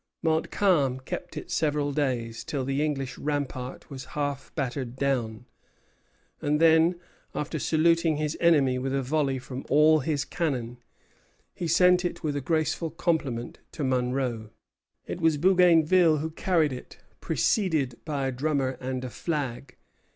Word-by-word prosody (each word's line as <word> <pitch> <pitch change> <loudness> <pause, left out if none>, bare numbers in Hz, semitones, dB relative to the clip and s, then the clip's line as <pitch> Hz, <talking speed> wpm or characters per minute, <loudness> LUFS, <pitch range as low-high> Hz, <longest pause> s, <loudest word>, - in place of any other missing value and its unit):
Montcalm 160 -4 +2
kept 130 - -6
it - - -7
several 150 -2 0
days, 125 -6 -2
till 135 -3 -3
the 135 +2 0
English 135 -4 -3
rampart 140 -4 -4
was 130 -2 -7
half 145 -2 -3
battered 130 -3 -3
down; 125 -4 -1 1.0
and 150 -1 +1
then, 165 +2 +4 0.4
after 150 +1 -3
saluting 165 +1 +2
his 150 0 -2
enemy 140 -7 +3
with 135 +1 -2
a 135 - 0
volley 140 0 0
from 130 +1 -7
all 155 +1 +5
his 145 0 -1
cannon, 125 -8 -3 0.7
he 175 - -4
sent 180 +2 +4
it 175 - -4
with 150 -2 -1
a 145 - -2
graceful 160 +3 0
compliment 150 -7 -2
to 150 - -4
Monro. 125 -3 -1 0.6
It 175 - -6
was 160 -2 +3
Bougainville 175 -1 +5
who 160 +2 -3
carried 160 -4 +1
it, 125 - -10 0.2
preceded 155 - 0
by 145 -3 -2
a 135 - 0
drummer 135 0 -1
and 130 0 -3
a - - -4
flag. 140 -6 -4
145 Hz, 145 wpm, -27 LUFS, 130-160 Hz, 1.0 s, all